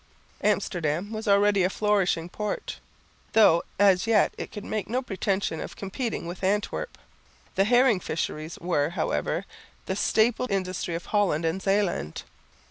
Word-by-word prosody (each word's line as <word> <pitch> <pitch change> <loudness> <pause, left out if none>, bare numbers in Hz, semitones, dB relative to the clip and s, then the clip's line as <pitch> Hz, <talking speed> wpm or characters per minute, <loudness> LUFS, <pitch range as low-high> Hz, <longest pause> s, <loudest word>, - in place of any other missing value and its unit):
Amsterdam 180 -3 0
was 220 0 -5
already 200 0 +4
a 180 - +3
flourishing 195 -5 +1
port, 210 +3 -4 0.5
though 170 -7 +6 0.2
as 195 0 +4
yet 225 -2 +3
it - - -7
could 205 - -7
make 215 -2 -3
no 255 +3 0
pretension 195 -6 -1
of - - -7
competing 215 +1 -4
with 175 +2 -7
Antwerp. 205 - -1 0.6
The 195 0 +2
herring 245 -2 +4
fisheries 155 -1 -4
were, 160 -4 0
however, 160 - -1 0.4
the 190 - -2
staple 225 +4 +2
industry 185 -3 -2
of 170 - -5
Holland 190 -7 +1
and 165 +4 -1
Zeeland. 195 - 0
195 Hz, 140 wpm, -26 LUFS, 175-210 Hz, 0.6 s, though